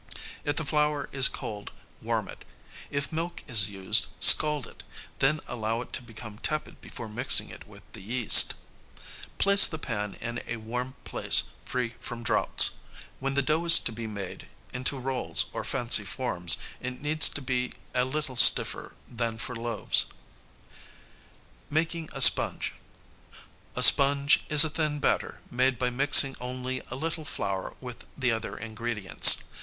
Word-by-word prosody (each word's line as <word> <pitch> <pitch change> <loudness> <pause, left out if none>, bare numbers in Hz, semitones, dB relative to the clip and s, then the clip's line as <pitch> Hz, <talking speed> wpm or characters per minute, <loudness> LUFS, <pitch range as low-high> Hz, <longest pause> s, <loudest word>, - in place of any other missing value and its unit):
If 145 - -4
the 160 - -5
flour 150 0 -3
is 135 -2 +5
cold 105 -1 -9 0.3
warm - - -5
it. - - -14 0.5
If 140 +1 -6
milk 165 +2 -7
is 105 -5 +5
used, 95 -2 0
scald 150 -4 +6
it, - - -16 0.4
then 150 +3 -1
allow 115 0 -6
it - - -14
to - - -6
become 110 -2 -13
tepid 155 +3 -6
before 115 - -11
mixing 120 +5 +3
it - - -15
with - - -18
the - - -12
yeast. 115 +3 +6 0.8
Place 200 0 +5
the 160 - -7
pan 105 -8 -7
in 120 +1 -8
a 120 - -7
warm 125 +4 -8
place - - +2 0.2
free 125 -2 -6
from 120 0 -10
draughts. 115 - +1 0.5
When 135 0 -5
the 140 - 0
dough 155 +4 -2
is 165 -1 +8
to - - -5
be 115 0 -9
made 100 -4 -10 0.3
into 130 +2 -2
rolls 130 0 0
or - - -7
fancy 120 -4 -1
forms, 90 -8 -1 0.2
it 125 0 -9
needs 155 +2 +4
to - - -7
be 125 -2 -5 0.2
a 125 - -1
little 135 0 -6
stiffer 125 - +4
than 115 -2 -6
for 125 +2 -8
loaves. 115 -1 +2
[Sidenote: - - -8 0.9
Making 160 +1 -4
a 135 - -6
sponge.] 115 - +4 1.0
A - - -1
sponge 140 +1 +4
is 150 -1 +7
a - - -4
thin 155 -2 -4
batter - - -4
made 130 +1 -2
by 125 +1 -4
mixing 135 +1 +5
only 130 +1 -7
a 130 - -8
little 160 +3 -6
flour 95 -9 -7
with 125 -2 -12
the 130 -3 -2
other 110 0 -7
ingredients. 110 -3 +3
125 Hz, 160 wpm, -24 LUFS, 115-145 Hz, 1.0 s, is